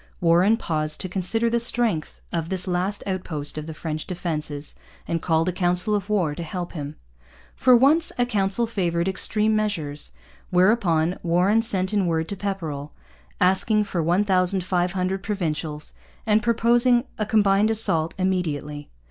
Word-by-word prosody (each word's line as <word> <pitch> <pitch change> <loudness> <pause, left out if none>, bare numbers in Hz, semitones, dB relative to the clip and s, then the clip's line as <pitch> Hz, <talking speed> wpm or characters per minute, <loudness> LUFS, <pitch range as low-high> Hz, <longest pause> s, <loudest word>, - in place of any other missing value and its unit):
Warren 180 +6 +4
paused 155 -6 -2
to 185 - -2
consider 195 +5 0
the 235 +1 +1
strength 230 -8 0
of 165 -1 -2
this 185 -1 -2
last 185 +3 -2
outpost 175 -6 -2
of 155 0 -5
the 160 - -6
French 155 -1 -5
defences 155 -5 -4 0.3
and 165 -1 -2
called 165 0 +1
a - - +2
council 180 +4 +1
of 205 -1 -2
war 180 -8 +1
to 160 - -7
help 175 +2 -5
him. 145 -3 -6 0.6
For 255 - +5
once 300 +7 +4
a 245 - +2
council 205 -1 0
favoured 175 -6 -1
extreme 215 +3 +1
measures; 165 -9 -2 0.4
whereupon 180 -3 +2
Warren 180 +6 +2
sent 195 -4 +1
in 200 -3 +1
word 160 -1 0
to 200 - -3
Pepperrell, 165 -8 -5 0.5
asking 210 +3 +3
for 185 -4 -3
1,500 185 +1 +1
Provincials, 155 -7 -4 0.3
and 215 0 +3
proposing 240 +2 +3 0.2
a 215 - 0
combined 205 -1 +3
assault 170 -8 +2
immediately. 150 -6 -2
185 Hz, 150 wpm, -23 LUFS, 165-210 Hz, 0.6 s, For